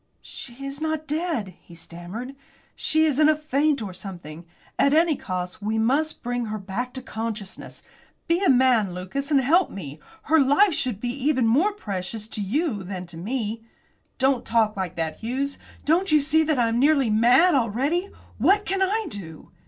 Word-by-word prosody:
"She 270 +2 -8
is 275 +2 -6
not 315 -1 -2
dead," 305 - -2
he 170 - -15
stammered. 175 +11 -8 0.4
"She 315 0 +2
is 295 -2 +1
in 305 0 +6
a 310 - +4
faint 300 -3 0
or 195 -3 -6
something. 175 -4 -9 0.3
At 280 +1 +4
any 325 -1 +4
cost 180 -3 -5
we 215 +2 -1
must 275 +8 0
bring 245 -1 -2
her 215 0 -4
back 210 +6 -4
to 260 - -5
consciousness. 220 -5 -6 0.4
Be 340 +3 +1
a - - +4
man, 245 -8 +3
Lucas, 190 +11 -4
and 290 -3 +4
help 330 +8 +3
me. 150 -6 -8 0.2
Her 320 +2 +3
life 295 +8 +4
should 250 -9 -2
be 245 - -3
even 265 -1 +1
more 290 - +3
precious 210 - -5
to 215 - -4
you 235 - -1
than 185 -1 -6
to 175 -1 -12
me." 220 +3 -3 0.6
"Don't 265 -1 +2
talk 225 -2 +1
like 185 -4 -4
that, 160 -1 -3
Hughes. 270 +5 -3 0.3
Don't 340 +4 +2
you 305 - +6
see 310 +2 +3
that 305 -2 +1
I 240 -2 +3
am 230 +1 0
nearly 275 -4 +3
mad 245 +11 +5
already? 275 - 0 0.3
What 410 +1 +3
can 385 0 -1
I 420 +4 +1
do?" 165 -7 -9
250 Hz, 185 wpm, -24 LUFS, 205-305 Hz, 0.6 s, in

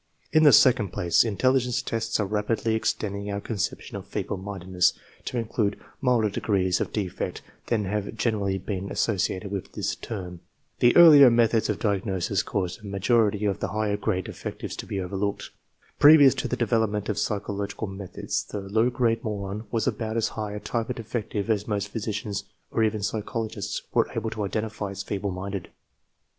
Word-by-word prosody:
In 155 - +5
the 150 -2 +8
second 125 -7 +6
place, 85 -2 +3
intelligence 125 +3 +1
tests 115 -1 -1
are 105 - +1
rapidly 110 +2 0
extending 100 -2 -2
our 100 0 -2
conception 105 -1 -4
of - - -5
<fc - - -25
feeble 100 - -3
mindedness 95 -2 0 0.2
" - - -28
to 125 - -3
include 110 -3 -1 0.2
milder 120 -5 +2
degrees 95 -3 +1
of - - -2
defect 95 -5 -3 0.2
than 110 -4 0
have 105 +2 -3
generally 105 -4 0
been 95 0 -4
associated 100 -2 -1
with 100 -2 -5
this - - -2
term. 90 -6 -7 0.4
The 120 - +5
earlier 150 -6 +10
methods 115 -1 +3
of - - 0
diagnosis 100 -2 0
caused 95 -1 -3
a 105 - -9
major 105 +3 +3
ity 105 +1 -2
of 100 -1 0
the - - -1
higher 110 -1 -1
grade 105 -3 -1
defectives - - -6
to - - -6
he 100 - -3
overlooked. 95 +2 -3 0.5
Pre 155 +2 +9
vious 140 -3 +6
to - - -1
the 125 - -2
development 110 -4 0
of 105 -1 -1
psychological 100 0 -2
methods 95 -2 -4
the 105 - -6
low 110 +5 +1
grade 120 -2 0
moron 105 0 -4
was 115 -2 0
about 110 0 -2
as 115 - +1
high 105 -2 -5
a 105 - -4
type 115 +2 -3
of 125 - -2
defective 110 -2 -3
as 105 -2 0
most 105 -1 -1
physicians 105 -2 -3 0.3
or 115 - +1
even 110 -1 0
psychologists 110 0 -3
were - - +2
able 110 - -2
to 105 - -3
identify 105 0 -3
as 100 0 -5
feeble 100 0 -3
minded. 95 0 -5
105 Hz, 180 wpm, -26 LUFS, 100-115 Hz, 0.5 s, earlier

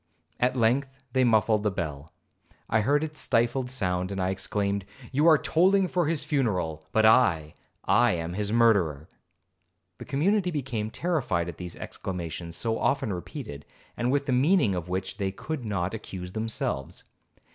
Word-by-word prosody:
At 125 +1 +1
length 125 +4 +2 0.2
they 130 - +3
muffled 110 -2 +3
the 105 - +1
bell. 80 -5 -5 0.6
I 110 0 +2
heard 145 +7 +2
its 155 -1 -4
stifled 120 +2 +1
sound, 95 -6 -1
and 100 - -3
I 90 0 +1
exclaimed, 100 +1 -1 0.3
'You 145 +5 +3
are 160 -2 +8
tolling 190 +5 +3
for 175 -3 0
his 155 -2 0
funeral, 95 - -1
but 110 0 +3
I,—I 110 +1 +3
am 85 0 -3
his 105 +2 -2
murderer!' 95 -10 +3 0.9
The - - -8
community 180 +7 +1
became 125 -9 -3
terrified 125 - -1
at 85 - -8
these 90 -1 -7
exclamations 85 -2 -6
so 115 -1 -1
often 110 -7 +1
repeated, 90 - -7 0.3
and 120 +1 0
with 140 0 +1
the 135 - -1
meaning 135 - +3
of 90 -1 -4
which 95 +2 -3
they 100 -2 -1
could 135 +6 -5
not 95 -3 -2
accuse 90 -4 -7
themselves. 110 -10 -3
110 Hz, 155 wpm, -27 LUFS, 90-135 Hz, 0.9 s, are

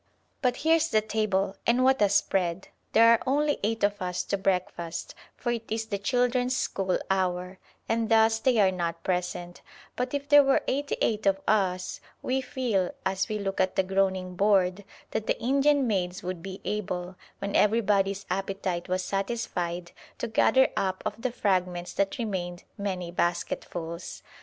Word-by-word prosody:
But 250 -3 +1
here's 325 0 +4
the 215 - +3
table, 205 -3 0
and 240 +2 +4
what 265 -2 +4
a 205 - +5
spread! 190 -2 0 0.2
There 230 +1 +7
are 230 - +2
only 290 +2 +2
eight 225 +1 -1
of 205 -1 +1
us 180 -1 -2
to - - -1
breakfast, 180 -3 -2 0.2
for 240 - -2
it 230 -1 -3
is 220 0 -1
the 205 -3 -3
children's 250 +3 +1
school 190 -2 0
hour, 185 0 -1 0.3
and 225 0 0
thus 225 0 +4
they 250 +1 +2
are 195 -2 +5
not 170 -2 -3
present; 180 -1 -3 0.3
but 250 +3 -2
if 285 0 -3
there 290 -1 +8
were 275 0 +3
eighty 285 +2 -1
eight 215 -2 +1
of 195 0 +3
us 185 -4 0 0.2
we 265 +1 0
feel, 245 -9 -1 0.2
as 190 0 0
we 215 - -1
look 195 -2 -1
at 185 0 0
the 190 - +3
groaning 190 -1 0
board, 195 -1 +2 0.3
that 220 -1 -2
the - - 0
Indian 275 +3 +3
maids 185 -5 -1
would 180 -1 -4
be 190 +1 -7
able, 185 -3 -3 0.2
when 200 0 -4
everybody's 200 -2 +2
appetite 190 -2 -2
was 185 0 0
satisfied, 180 -4 -3 0.3
to - - -3
gather 260 +4 +4
up 185 -1 -1
of 215 +1 -4
the 255 0 -1
fragments 180 -5 -1
that 195 0 0
remained 180 -6 -3
many 185 -4 -3
basketfuls. 175 -1 -3
195 Hz, 165 wpm, -27 LUFS, 185-230 Hz, 0.3 s, there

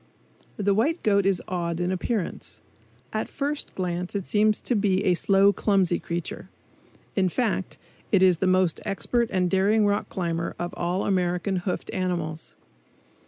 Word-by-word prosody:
The 200 -1 +2
white 290 - +1
goat 200 -2 +3
is 190 -3 +1
odd 170 -3 -2
in 180 +1 0
appearance. 190 +1 -3 0.5
At - - -2
first 290 +1 -3
glance 180 0 -3
it 195 -2 -2
seems 215 0 +2
to - - -1
be 200 -2 +2
a 185 - +4
slow, 195 +3 +4
clumsy 195 -5 +2
creature; 170 0 -5 0.7
in 190 -2 +2
fact, 210 -2 -1 0.3
it 195 -2 +5
is 180 -3 +4
the 190 - +1
most 185 -2 +2
expert 215 +5 0
and 185 -2 +1
daring 200 +4 +3
rock 205 0 0
climber 170 -3 -2
of 175 0 -4
all 175 +2 -1
American 180 0 0
hoofed 180 0 -3
animals. 170 -4 -3
190 Hz, 155 wpm, -25 LUFS, 175-205 Hz, 0.7 s, it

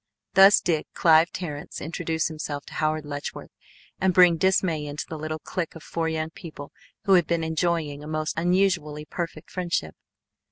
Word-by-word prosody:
Thus 195 +2 +8
did 160 -4 0
Clive 165 0 +5
Terrence 150 -5 -6
introduce 160 0 -2
himself 150 -2 -5
to - - -12
Howard 155 -1 -1
Letchworth 145 -1 -6 0.5
and 190 -1 +2
bring 180 -2 +7
dismay 170 -4 +1
into 145 +1 -5
the 160 - -6
little 155 0 -4
clique 165 +2 -4
of 160 - -10
four 165 -1 -2
young 160 0 -2
people 155 -5 -10 0.3
who 195 -3 +3
had 175 -4 +5
been 170 -1 0
enjoying 160 -3 -1
a - - -8
most 155 0 -2
unusually 170 -4 +1
perfect 165 -1 -6
friendship. 170 - -2
160 Hz, 165 wpm, -25 LUFS, 155-175 Hz, 0.5 s, Thus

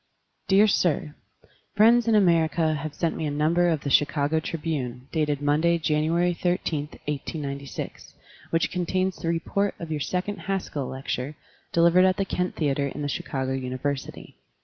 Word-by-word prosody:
Dear 200 +2 +6
Sir: 170 -7 +1 0.6
Friends 230 +3 +5
in 225 - +4
America 165 -4 +3
have 150 0 -5
sent 165 0 -1
me 155 - -2
a - - -1
number 160 +4 +2
of 160 -4 0
the 140 - -3
Chicago 150 +2 +2
Tribune, 145 -6 -4
dated 150 -3 0
Monday, 155 +4 +3
January 165 +3 +1
13, 170 -4 -1 0.2
1896, 140 -1 -5 0.3
which 165 0 +1
contains 185 +1 -1
the - - -5
report 170 +5 0
of 165 -2 -6
your 155 - -1
second 185 +7 -2
Haskell 185 -9 -3
lecture, 130 +2 -4 0.4
delivered 170 +2 +5
at 185 -1 +3
the 195 - 0
Kent 180 -1 -2
Theater 140 -2 0
in 145 +2 -5
the - - -1
Chicago 135 -1 -3
University. 130 +1 -4
160 Hz, 150 wpm, -25 LUFS, 145-175 Hz, 0.6 s, Dear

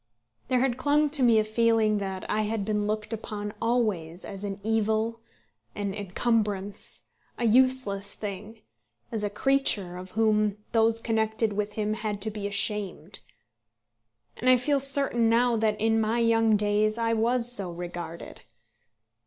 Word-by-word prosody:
There 255 -1 +2
had 255 -2 0
clung 290 +2 +2
to 295 -2 +1
me 235 -3 +5
a 215 - +4
feeling 220 -1 +2
that 190 -1 -5
I 215 - 0
had 215 -1 -2
been 210 -1 -1
looked 215 +1 -2
upon 210 -1 -5
always 210 -8 -1
as 195 0 -7
an 200 -1 -4
evil, 220 +1 0 0.6
an 200 -1 -3
encumbrance, 205 0 -1 0.3
a 240 - -1
useless 235 -4 +2
thing, 210 +2 -7 0.5
as 220 -2 -3
a 205 - 0
creature 210 -6 +1
of 185 +1 -9
whom 215 0 +1
those 225 0 +3
connected 220 -1 0
with 210 0 -2
him 215 0 -1
had 215 -2 -3
to 220 - -1
be 205 -1 -4
ashamed. 200 -3 -1 1.2
And 255 - +1
I 255 - +7
feel 280 +3 +1
certain 275 -4 +1
now 240 +1 +3
that 215 -1 0
in 225 +1 +2
my 220 +2 0
young 225 -1 +3
days 210 +1 +2
I 230 0 +1
was 235 +2 +1
so 195 -7 -2
regarded. 175 -1 -7
215 Hz, 155 wpm, -27 LUFS, 205-230 Hz, 1.2 s, I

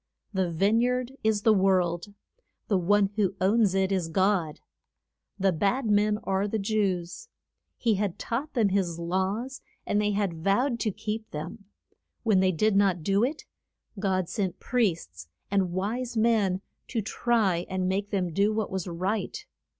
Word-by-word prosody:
The 190 -3 0
vine 200 +7 +3
yard 250 +1 0
is 215 -2 +1
the 220 - +6
world. 185 -1 +1 0.5
The 200 - +3
one 200 +2 +3
who 195 -3 +1
owns 200 +1 +3
it 190 0 +1
is 185 -4 0
God. 185 -3 +1 0.8
The 195 -1 +2
bad 200 - 0
men 210 0 +3
are 195 +1 0
the 220 - -1
Jews; 195 - -1 0.5
he 230 -2 +2
had 200 -4 -1
taught 265 +6 -4
them 220 -5 +3
his 185 -4 0
laws, 190 +9 -2 0.2
and 205 - +1
they 210 - +1
had 190 -6 -2
vowed 235 +6 +2
to 215 - 0
keep 215 +3 -5
them. 170 +8 -7 0.6
When 215 -5 +3
they 185 0 +3
did 205 +5 +1
not 195 -4 +2
do 200 +5 +2
it, 290 +5 -2 0.5
God 190 -3 0
sent 190 -4 -3
priests 165 - -1 0.2
and 195 -3 +1
wise 225 +7 -2
men 215 -5 +2 0.3
to 225 -4 -2
try 205 -6 +1
and 185 0 -1
make 195 +2 -1
them 180 -4 -1
do 200 +4 +3
what 215 -1 -2
was 190 -1 -3
right. 195 - -3
200 Hz, 160 wpm, -27 LUFS, 185-220 Hz, 0.8 s, the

